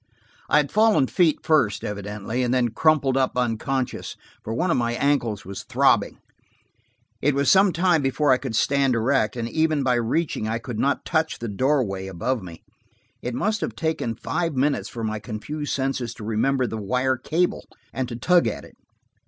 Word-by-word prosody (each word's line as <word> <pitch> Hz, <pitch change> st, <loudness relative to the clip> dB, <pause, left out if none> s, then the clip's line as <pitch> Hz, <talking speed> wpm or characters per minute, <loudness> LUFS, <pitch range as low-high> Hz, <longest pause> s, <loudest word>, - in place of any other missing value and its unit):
I -, -, +4 dB
had 145 Hz, -2 st, +1 dB
fallen 215 Hz, -8 st, +4 dB
feet 155 Hz, -, +1 dB
first, 145 Hz, -10 st, +2 dB
evidently, 105 Hz, +3 st, -4 dB
and 125 Hz, -1 st, 0 dB
then 125 Hz, -2 st, +2 dB
crumpled 140 Hz, +1 st, +2 dB
up 130 Hz, -1 st, 0 dB
unconscious, 125 Hz, +2 st, -2 dB, 0.3 s
for 110 Hz, -, -5 dB
one 170 Hz, +10 st, 0 dB
of -, -, +2 dB
my 120 Hz, -1 st, 0 dB
ankles 120 Hz, -7 st, 0 dB
was 95 Hz, +1 st, -6 dB
throbbing. -, -, +2 dB, 1.0 s
It 145 Hz, 0 st, +2 dB
was 140 Hz, 0 st, +3 dB
some 195 Hz, 0 st, +5 dB
time 175 Hz, -2 st, +2 dB
before 140 Hz, +1 st, +1 dB
I 130 Hz, -, +4 dB
could 130 Hz, -5 st, -4 dB
stand 135 Hz, +1 st, +2 dB
erect, 115 Hz, -1 st, +1 dB
and 115 Hz, -2 st, -3 dB
even 155 Hz, +2 st, +1 dB
by 130 Hz, -1 st, +2 dB
reaching, 120 Hz, +1 st, -1 dB
I 110 Hz, +1 st, -1 dB
could 115 Hz, -1 st, -6 dB
not 140 Hz, +1 st, 0 dB
touch 160 Hz, -1 st, 0 dB
the 115 Hz, -, -5 dB
doorway 105 Hz, -4 st, 0 dB
above 105 Hz, +7 st, -2 dB
me. 85 Hz, -3 st, -11 dB, 0.6 s
It 125 Hz, -1 st, -4 dB
must 215 Hz, -, -1 dB
have -, -, -3 dB
taken 160 Hz, -8 st, -2 dB
five 165 Hz, +6 st, -2 dB
minutes 140 Hz, +2 st, 0 dB
for 115 Hz, -, -6 dB
my 110 Hz, -1 st, -2 dB
confused 125 Hz, +8 st, -4 dB
senses 130 Hz, -3 st, -2 dB
to -, -, -10 dB
remember 125 Hz, +5 st, +1 dB
the 110 Hz, -, -4 dB
wire 125 Hz, +5 st, 0 dB
cable, 165 Hz, +7 st, -1 dB, 0.3 s
and 130 Hz, -2 st, -3 dB
to 120 Hz, -, -5 dB
tug 175 Hz, +8 st, +3 dB
at -, -, -4 dB
it. -, -, -18 dB
130 Hz, 185 wpm, -24 LUFS, 115-150 Hz, 1.0 s, some